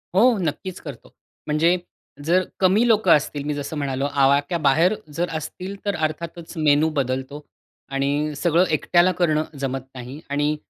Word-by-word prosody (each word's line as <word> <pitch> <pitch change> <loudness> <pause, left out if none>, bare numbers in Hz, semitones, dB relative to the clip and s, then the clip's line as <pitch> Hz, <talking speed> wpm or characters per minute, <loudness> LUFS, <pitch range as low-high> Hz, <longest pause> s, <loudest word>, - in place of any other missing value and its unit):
हो, 235 +3 +5
नक्कीच 175 +1 -3
करतो. - - -10 0.3
म्हणजे 165 +4 +3 0.5
जर 180 +3 +3 0.2
कमी 200 +6 +4
लोकं 215 -6 +4
असतील, 145 -1 +2
मी 150 - -2
जसं 145 +2 -5
म्हणालो 135 -1 -2 0.2
आवाक्याबाहेर 145 +5 +3 0.2
जर 175 +3 -1
असतील 180 +5 -7
तर 200 - 0
अर्थातच 165 +2 -6
मेनू 155 0 +3
बदलतो. 135 +3 -3 0.5
आणि 145 +2 0
सगळं 170 +4 +2
एकट्याला 175 +3 +3
करणं 155 -3 +2 0.2
जमत 135 -1 -2
नाही. 125 +3 -8
आणि 145 +1 0
155 Hz, 140 wpm, -22 LUFS, 145-175 Hz, 0.5 s, हो